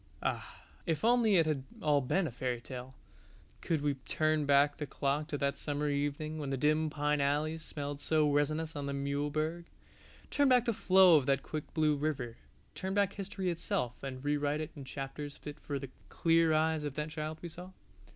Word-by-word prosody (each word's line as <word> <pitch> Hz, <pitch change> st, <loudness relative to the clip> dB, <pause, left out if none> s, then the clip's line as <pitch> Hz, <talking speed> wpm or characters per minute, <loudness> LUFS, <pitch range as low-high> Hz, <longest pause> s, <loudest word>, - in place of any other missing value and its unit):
Ah, -, -, -3 dB, 0.2 s
if 165 Hz, +5 st, 0 dB
only 235 Hz, -3 st, +4 dB
it 165 Hz, -3 st, +5 dB
had 150 Hz, -4 st, -1 dB, 0.2 s
all 150 Hz, -6 st, +3 dB
been 175 Hz, +9 st, +1 dB
a 150 Hz, -, -3 dB
fairy 125 Hz, 0 st, -2 dB
tale. 130 Hz, +1 st, -8 dB, 0.7 s
Could 160 Hz, -4 st, 0 dB
we 145 Hz, -1 st, +2 dB
but 135 Hz, -1 st, -17 dB
turn 155 Hz, -2 st, +1 dB
back 145 Hz, +1 st, +4 dB
the 150 Hz, -, -4 dB
clock 145 Hz, +2 st, -1 dB
to 150 Hz, -, -3 dB
that 140 Hz, 0 st, -1 dB
summer 145 Hz, 0 st, -1 dB
evening 145 Hz, +2 st, -2 dB
when 145 Hz, -2 st, -3 dB
the 135 Hz, -, -1 dB
dim 155 Hz, +3 st, +2 dB
pine 150 Hz, 0 st, 0 dB
alleys 150 Hz, +3 st, 0 dB
smelled 145 Hz, -2 st, -5 dB
so 155 Hz, -1 st, +3 dB
resinous 155 Hz, +2 st, 0 dB
on 145 Hz, -1 st, -3 dB
the 140 Hz, -, -2 dB
Muehlberg, 150 Hz, +4 st, -1 dB, 0.7 s
turn 285 Hz, -1 st, +3 dB
back 250 Hz, -2 st, +5 dB
the 235 Hz, -, +1 dB
flow 190 Hz, -5 st, +6 dB
of 140 Hz, -2 st, 0 dB
that 135 Hz, -1 st, +2 dB
quick 155 Hz, -1 st, -5 dB
blue 155 Hz, -1 st, +3 dB
river, 140 Hz, -6 st, -2 dB, 0.4 s
turn 190 Hz, +1 st, -3 dB
back 200 Hz, -1 st, +2 dB
history 195 Hz, -2 st, -3 dB
itself 125 Hz, -7 st, -2 dB
and 135 Hz, 0 st, -6 dB
rewrite 145 Hz, 0 st, +1 dB
it 155 Hz, -, -4 dB
in 140 Hz, -, -8 dB
chapters 140 Hz, +2 st, -6 dB
fit 150 Hz, 0 st, -8 dB
for 145 Hz, -, -4 dB
the 135 Hz, -1 st, -7 dB, 0.2 s
clear 165 Hz, -1 st, +3 dB
eyes 155 Hz, 0 st, +2 dB
of 145 Hz, -2 st, -4 dB
that 150 Hz, +1 st, -3 dB
child 155 Hz, 0 st, -4 dB
we 170 Hz, -, -4 dB
saw. 180 Hz, +3 st, -9 dB
150 Hz, 200 wpm, -32 LUFS, 140-160 Hz, 0.7 s, flow